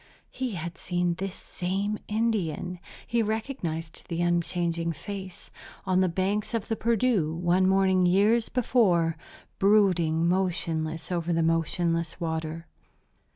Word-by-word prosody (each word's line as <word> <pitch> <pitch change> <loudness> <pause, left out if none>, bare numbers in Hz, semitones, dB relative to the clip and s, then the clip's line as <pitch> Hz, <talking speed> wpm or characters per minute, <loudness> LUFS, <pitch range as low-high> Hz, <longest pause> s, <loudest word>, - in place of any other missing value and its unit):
He 255 -3 -3
had 170 0 -6
seen 175 -1 0
this 190 +2 -5
same 195 +4 -3
Indian 200 -6 -1 0.3
he 235 0 +1
recognized 210 - -3
the 170 0 -1
unchanging 170 -1 0
face 190 +3 -8 0.3
on 185 -1 +2
the 185 -1 +3
banks 195 +6 -1
of 225 - -3
the 225 - +1
Perdu 225 -7 +1
one 180 +2 +2
morning 190 -1 +3
years 210 +5 +3
before, 190 -10 +2 0.4
brooding 180 -5 +3
motionless 165 -3 -1
over 175 -1 -1
the 165 -1 +2
motionless 165 +1 0
water. 160 -1 -3
180 Hz, 120 wpm, -27 LUFS, 165-205 Hz, 0.4 s, the